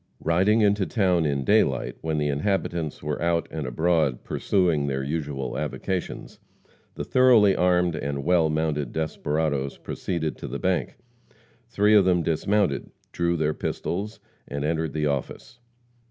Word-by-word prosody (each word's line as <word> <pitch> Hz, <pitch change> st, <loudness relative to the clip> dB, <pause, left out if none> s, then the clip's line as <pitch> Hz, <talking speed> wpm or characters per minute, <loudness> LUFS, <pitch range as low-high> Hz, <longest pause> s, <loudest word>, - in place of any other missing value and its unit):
Riding 95 Hz, +7 st, +3 dB
into 100 Hz, -2 st, +2 dB
town 90 Hz, -7 st, +2 dB
in 70 Hz, -2 st, -1 dB
daylight, 65 Hz, -, +2 dB
when 80 Hz, -1 st, -2 dB
the 75 Hz, -1 st, 0 dB
inhabitants 85 Hz, 0 st, -2 dB
were 75 Hz, 0 st, -3 dB
out 85 Hz, 0 st, +1 dB
and 75 Hz, -4 st, -4 dB
abroad 80 Hz, 0 st, +1 dB
pursuing 85 Hz, -7 st, +1 dB
their 70 Hz, -1 st, -2 dB
usual 70 Hz, -3 st, -3 dB
avocations, 95 Hz, -2 st, -4 dB, 0.6 s
the -, -, -4 dB
thoroughly 120 Hz, -6 st, +5 dB
armed 90 Hz, -2 st, +2 dB
and 70 Hz, -2 st, -3 dB
well 85 Hz, -1 st, +3 dB
mounted 75 Hz, -4 st, -1 dB
desperadoes 75 Hz, -3 st, -2 dB
proceeded 80 Hz, -4 st, -4 dB
to -, -, -7 dB
the -, -, -4 dB
bank. -, -, -1 dB, 0.7 s
Three 105 Hz, -1 st, +3 dB
of 105 Hz, -2 st, +7 dB
them 90 Hz, -2 st, +2 dB
dismounted, 85 Hz, 0 st, 0 dB, 0.2 s
drew 85 Hz, 0 st, 0 dB
their 75 Hz, -1 st, 0 dB
pistols, 100 Hz, +8 st, -4 dB, 0.3 s
and 70 Hz, +1 st, -3 dB
entered 80 Hz, -1 st, -1 dB
the 75 Hz, -1 st, -1 dB
office. 75 Hz, -, -4 dB
80 Hz, 140 wpm, -25 LUFS, 75-95 Hz, 0.7 s, of